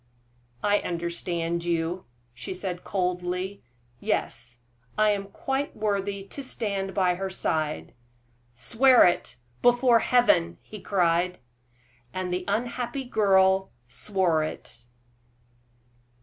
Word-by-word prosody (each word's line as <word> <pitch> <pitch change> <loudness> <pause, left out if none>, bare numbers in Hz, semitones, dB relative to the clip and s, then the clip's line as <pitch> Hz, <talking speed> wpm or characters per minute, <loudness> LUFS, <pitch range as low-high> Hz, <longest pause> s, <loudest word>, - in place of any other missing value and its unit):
"I 205 0 +3
understand 170 0 -2
you," 170 +1 -1 0.3
she 125 +9 -6
said, 180 -1 -5
coldly. 180 +1 -2 0.4
"Yes, 120 0 -2 0.4
I 215 0 +4
am 200 -1 -1
quite 270 +7 -3
worthy 200 -2 -1
to 275 +8 -8
stand 200 -6 -3
by 185 -3 +3
her 190 +2 -3
side." 155 -5 -2 0.6
"Swear 235 - +5
it, 175 - +1 0.3
before 245 -1 +5
Heaven!" 155 - +3
he 215 - -10
cried. 180 -1 +1 0.8
And 185 -1 -2
the 180 0 -2
unhappy 240 +5 -2
girl 190 -5 +3 0.2
swore 175 +2 0
it! 120 -5 -8
190 Hz, 105 wpm, -26 LUFS, 170-210 Hz, 0.8 s, Swear